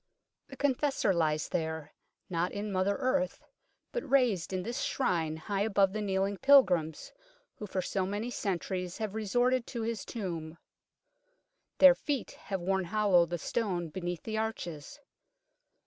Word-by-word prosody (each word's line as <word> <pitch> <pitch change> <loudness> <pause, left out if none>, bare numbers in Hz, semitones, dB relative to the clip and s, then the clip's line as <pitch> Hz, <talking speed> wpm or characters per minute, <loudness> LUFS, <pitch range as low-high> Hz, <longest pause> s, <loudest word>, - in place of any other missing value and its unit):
The 270 - -11
Confessor 275 -6 +1
lies 155 -3 0
there, 160 -2 -3 0.3
not 175 0 -1
in 205 +1 -4
mother 190 +1 +1
earth, 270 +3 0 0.5
but 485 - -4
raised 245 -11 +2
in 185 -1 -2
this 235 +5 -3
Shrine 165 - 0
high 195 +5 -2
above 200 -2 +3
the 215 - -2
kneeling 195 0 0
pilgrims 180 - +4 0.5
who 210 - -6
for 185 -1 -2
so 185 +1 -1
many 210 +5 -3
centuries 185 -3 -3
have 215 -3 -3
resorted 245 +4 +1
to 235 -4 -4
his 230 -1 -2
tomb. 170 -7 -5 1.2
Their 275 -1 +9
feet 280 -1 -3 0.2
have 195 -2 -1
worn 190 +1 0
hollow 195 -3 +3
the 175 +1 -3
stone 180 -2 -2
beneath 175 0 -4
the 220 -1 -2
arches. 200 - -5
195 Hz, 145 wpm, -31 LUFS, 175-230 Hz, 1.2 s, Their